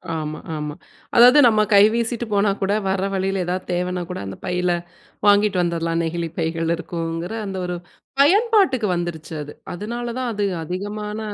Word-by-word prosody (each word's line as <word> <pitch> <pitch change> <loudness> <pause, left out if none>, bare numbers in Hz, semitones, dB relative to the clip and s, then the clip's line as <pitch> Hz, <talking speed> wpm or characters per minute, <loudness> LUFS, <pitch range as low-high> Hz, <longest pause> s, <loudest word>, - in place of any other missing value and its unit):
ஆமா. 155 -1 -4 0.2
ஆமா. 150 -1 -4 0.4
அதாவது 250 +4 +8
நம்ம 215 -2 +4
கை 200 - +8
வீசிட்டு 235 0 -1
போனா 200 0 +3
கூட, 195 +1 +1 0.2
வர 190 0 0
வழியில 190 0 0
ஏதாவது 180 +1 -3
தேவைன்னா 180 0 -1
கூட, 180 - -4
அந்த 95 0 -7
பையில 180 -1 0 0.6
வாங்கிட்டு 205 -2 +4
வந்துரலாம். 170 -1 0
நெகிழிப் 165 0 -3
பைகள் 165 0 0
இருக்குங்கிற 165 +2 -4
அந்த 190 -1 -5
ஒரு 180 - -3 0.5
பயன்பாட்டுக்கு 380 - +4
வந்துருச்சு 170 -2 -4
அது. 145 - -10 0.2
அதனால 235 +6 -5
தான் 250 -2 -2
அது 205 -1 -1 0.2
அதிகமான 210 +5 -4
185 Hz, 155 wpm, -22 LUFS, 170-215 Hz, 0.6 s, அதாவது